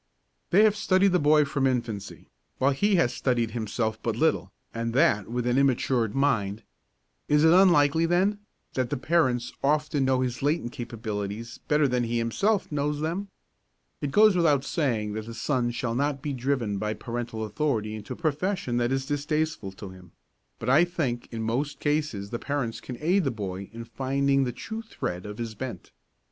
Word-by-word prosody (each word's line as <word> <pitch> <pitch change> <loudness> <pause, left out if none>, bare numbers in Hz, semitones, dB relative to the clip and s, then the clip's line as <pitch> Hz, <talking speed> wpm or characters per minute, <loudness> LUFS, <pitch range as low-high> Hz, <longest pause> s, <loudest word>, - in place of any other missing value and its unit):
They 195 +4 +5
have 215 -1 +4
studied 195 -2 +3
the 180 - +3
boy 150 0 +5
from 140 -1 0
infancy, 115 -6 -3 0.3
while 135 +2 +3
he 200 +9 +2
has 145 -9 +2
studied 120 -4 0
himself 110 0 -2
but 115 -2 -1
little, 115 - +1 0.2
and 115 0 -3
that 130 - +3
with 120 0 -2
an 125 +1 +2
immatured 125 -4 +1
mind. 115 -7 +1 0.6
Is 150 +1 +3
it 160 +1 +6
unlikely, 165 -4 +5
then, 190 +4 +2 0.3
that 130 -2 -1
the - - -1
parents 130 -5 +1
often 150 -1 +1
know 130 -1 +2
his 125 -2 -2
latent 145 -3 0
capabilities 110 -1 -5
better 150 -1 +3
than 125 -2 0
he 120 +1 -1
himself 190 - 0
knows 150 0 -1
them? 170 +6 -2 0.7
It 145 - -1
goes 210 +5 +5
without 150 -6 +3
saying 115 -11 -1
that 110 +1 -5
the 115 - -7
son 125 0 0
shall 120 0 -2
not 140 +2 -1
be 145 - -2
driven 125 -6 -1
by 105 +1 -2
parental 115 -2 -4
authority 110 -2 -1
into 110 -1 -6
a - - -8
profession 160 -4 -1
that 120 +1 +1
is 135 0 0
distasteful 145 -6 -1
to 95 0 -9
him; 90 -2 -15 0.4
but 115 - -7
I 140 +7 +6
think 155 -9 -2
in 115 -1 -4
most 130 +6 -2
cases 145 -10 -1
the 120 - -3
parents 140 -6 -3
can 125 - -7
aid 180 +5 +3
the 140 - +1
boy 100 -4 -5
in 115 +1 -8
finding 135 +2 +1
the 125 - -2
true 220 - -6
thread 90 - -5
of 105 0 -7
his 115 -2 -4
bent. 115 -4 -7
130 Hz, 180 wpm, -27 LUFS, 115-150 Hz, 0.7 s, it